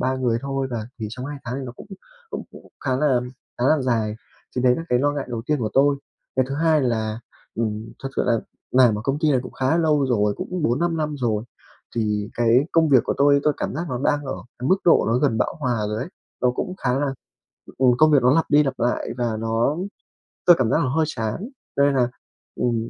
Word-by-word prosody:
3 130 Hz, +1 st, 0 dB
người 120 Hz, -3 st, +1 dB
thôi. 135 Hz, -1 st, -2 dB
Và 110 Hz, -2 st, -4 dB
thì 110 Hz, -, -3 dB
trong 125 Hz, +3 st, -6 dB
2 145 Hz, 0 st, -6 dB
tháng 120 Hz, +2 st, -4 dB
thì 135 Hz, -, -5 dB
nó 120 Hz, -, -7 dB
cũng -, -, -13 dB, 0.4 s
cũng -, -, -4 dB
cũng -, -, -14 dB, 0.2 s
khá 130 Hz, -2 st, +1 dB
là 130 Hz, -3 st, +2 dB, 0.4 s
khá 120 Hz, -, 0 dB
là 155 Hz, -1 st, +4 dB
dài. 115 Hz, -4 st, 0 dB, 0.4 s
Thì 125 Hz, -, 0 dB
đấy 125 Hz, -1 st, +5 dB
là -, -, -4 dB
cái 125 Hz, -, +3 dB
lo 145 Hz, +2 st, +2 dB
ngại 140 Hz, -3 st, -4 dB
đầu 115 Hz, -2 st, -4 dB
tiên 150 Hz, -1 st, +1 dB
của 110 Hz, -4 st, -2 dB
tôi. 140 Hz, +1 st, +4 dB, 0.4 s
Cái 130 Hz, -, +3 dB
thứ 135 Hz, -, -3 dB
hai 160 Hz, 0 st, +3 dB
là, 110 Hz, -2 st, -1 dB, 0.3 s
ừm, 110 Hz, -1 st, -3 dB
thật 135 Hz, -, -3 dB
sự -, -, +2 dB
là 115 Hz, -2 st, +2 dB, 0.3 s
làm 125 Hz, -5 st, +4 dB
ở -, -, -6 dB
công 140 Hz, +2 st, 0 dB
ty 155 Hz, -1 st, +2 dB
này 130 Hz, -3 st, +3 dB
cũng -, -, -9 dB
khá 135 Hz, +6 st, +1 dB
lâu 150 Hz, -4 st, +2 dB
rồi, 105 Hz, -4 st, +1 dB
cũng 180 Hz, -3 st, -4 dB
4-5 165 Hz, +7 st, +1 dB
năm 150 Hz, -2 st, -2 dB
rồi. 110 Hz, -3 st, 0 dB, 0.5 s
Thì 105 Hz, -2 st, -1 dB
cái 120 Hz, +1 st, +4 dB
công 165 Hz, -1 st, +4 dB
việc 130 Hz, -5 st, +5 dB
của -, -, -1 dB
tôi, 140 Hz, 0 st, +4 dB
tôi 150 Hz, -, +3 dB
cảm -, -, -3 dB
giác 170 Hz, +5 st, -3 dB
nó 125 Hz, -3 st, -2 dB
đang 145 Hz, 0 st, +1 dB
ở 135 Hz, -, -3 dB, 0.2 s
cái 125 Hz, -, -2 dB
mức 190 Hz, -, +5 dB
độ 170 Hz, -, +5 dB
nó 115 Hz, +2 st, +2 dB
gần 135 Hz, -6 st, +1 dB
bão -, -, 0 dB
hòa 120 Hz, -2 st, 0 dB
rồi 105 Hz, -, -2 dB
ấy. 130 Hz, -, -4 dB, 0.3 s
Nó 125 Hz, -, +4 dB
cũng 180 Hz, +9 st, -4 dB
khá 125 Hz, +1 st, +2 dB
là 140 Hz, -2 st, -1 dB, 0.6 s
ừ, 130 Hz, -, +3 dB
công 155 Hz, 0 st, +6 dB
việc 140 Hz, -, +5 dB
nó 125 Hz, +3 st, +5 dB
lặp 165 Hz, -, +3 dB
đi 145 Hz, +1 st, +6 dB
lặp 135 Hz, -, -3 dB
lại 120 Hz, +1 st, 0 dB
và 120 Hz, -2 st, 0 dB
nó 115 Hz, +6 st, 0 dB, 0.7 s
tôi 175 Hz, -, +8 dB
cảm 120 Hz, -, +2 dB
giác -, -, +3 dB
nó 130 Hz, -, 0 dB
hơi 160 Hz, -, +3 dB
chán. 120 Hz, -, -3 dB, 0.3 s
Cho 140 Hz, -, +3 dB
nên 140 Hz, 0 st, +4 dB
là, 125 Hz, -1 st, +2 dB, 0.5 s
ừm, 115 Hz, -2 st, -1 dB
130 Hz, 245 wpm, -23 LUFS, 115-145 Hz, 0.7 s, tôi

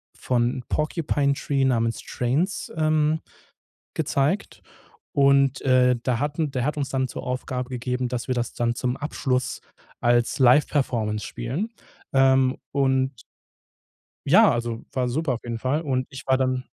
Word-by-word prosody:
von 125 Hz, 0 st, 0 dB
„Porcupine 150 Hz, -2 st, 0 dB
Tree“ 140 Hz, -1 st, 0 dB
namens 115 Hz, -3 st, +1 dB
„Trains“, 145 Hz, +11 st, -1 dB
ähm, 155 Hz, 0 st, +2 dB, 0.8 s
gezeigt. 145 Hz, +9 st, -1 dB, 0.5 s
Und, 140 Hz, -1 st, +3 dB
äh, 125 Hz, -1 st, +4 dB
da 125 Hz, -3 st, 0 dB
hatten 150 Hz, +1 st, -1 dB
der 130 Hz, -2 st, -1 dB
hat 150 Hz, +1 st, -1 dB
uns 140 Hz, -1 st, -2 dB
dann 130 Hz, -1 st, 0 dB
zur -, -, -7 dB
Aufgabe 125 Hz, 0 st, -3 dB
gegeben, 125 Hz, 0 st, -2 dB
dass 125 Hz, -1 st, -4 dB
wir 130 Hz, -, 0 dB
das 120 Hz, -1 st, -2 dB
dann 120 Hz, 0 st, 0 dB
zum 125 Hz, 0 st, -1 dB
Abschluss 130 Hz, -3 st, -2 dB, 0.4 s
als 120 Hz, 0 st, +2 dB
Liveperformance 125 Hz, -5 st, +2 dB
spielen. 130 Hz, -, -4 dB, 0.4 s
Ähm, 135 Hz, -1 st, +4 dB
und 130 Hz, -2 st, +1 dB, 1.1 s
ja, -, -, +7 dB
also, 115 Hz, -1 st, -3 dB
war 130 Hz, -1 st, 0 dB
super 135 Hz, +2 st, 0 dB
auf 120 Hz, -, -6 dB
jeden 115 Hz, -1 st, -4 dB
Fall. 135 Hz, +6 st, 0 dB
Und 130 Hz, -3 st, -1 dB
ich 135 Hz, -, -9 dB
war 130 Hz, -, +3 dB
dann 130 Hz, -1 st, 0 dB
130 Hz, 145 wpm, -24 LUFS, 125-140 Hz, 1.1 s, ja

